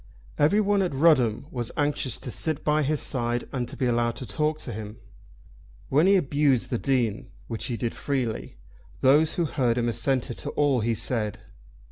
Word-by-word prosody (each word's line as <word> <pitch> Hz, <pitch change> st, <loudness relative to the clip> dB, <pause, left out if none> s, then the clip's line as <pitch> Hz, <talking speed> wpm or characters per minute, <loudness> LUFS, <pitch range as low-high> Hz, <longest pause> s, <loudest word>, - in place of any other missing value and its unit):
Everyone 200 Hz, +6 st, +3 dB
at 180 Hz, -7 st, -1 dB
Rudham 135 Hz, -6 st, +3 dB
was 120 Hz, -3 st, -3 dB
anxious 145 Hz, -5 st, 0 dB
to 125 Hz, -, -5 dB
sit 155 Hz, +5 st, -2 dB
by 150 Hz, 0 st, +2 dB
his 150 Hz, +1 st, 0 dB
side 120 Hz, -1 st, -1 dB
and 125 Hz, -3 st, -2 dB
to -, -, -7 dB
be 130 Hz, -, 0 dB
allowed 120 Hz, -1 st, +1 dB
to 130 Hz, -, -6 dB
talk 150 Hz, +8 st, -1 dB
to 120 Hz, -, -6 dB
him. 105 Hz, +1 st, -7 dB, 0.9 s
When 150 Hz, +7 st, +4 dB
he 200 Hz, -, +6 dB
abused 140 Hz, -6 st, +2 dB
the 120 Hz, -, 0 dB
Dean, 120 Hz, -6 st, 0 dB, 0.2 s
which 115 Hz, -2 st, -5 dB
he 120 Hz, -, -3 dB
did 115 Hz, -1 st, -2 dB
freely, 125 Hz, -, -3 dB, 0.4 s
those 150 Hz, +4 st, +4 dB
who 170 Hz, -, +1 dB
heard 125 Hz, -6 st, 0 dB
him 120 Hz, -1 st, +1 dB
assented 125 Hz, 0 st, -1 dB
to -, -, -4 dB
all 145 Hz, -3 st, +3 dB
he 115 Hz, +1 st, 0 dB
said. 110 Hz, -3 st, -1 dB
130 Hz, 180 wpm, -26 LUFS, 120-150 Hz, 0.9 s, he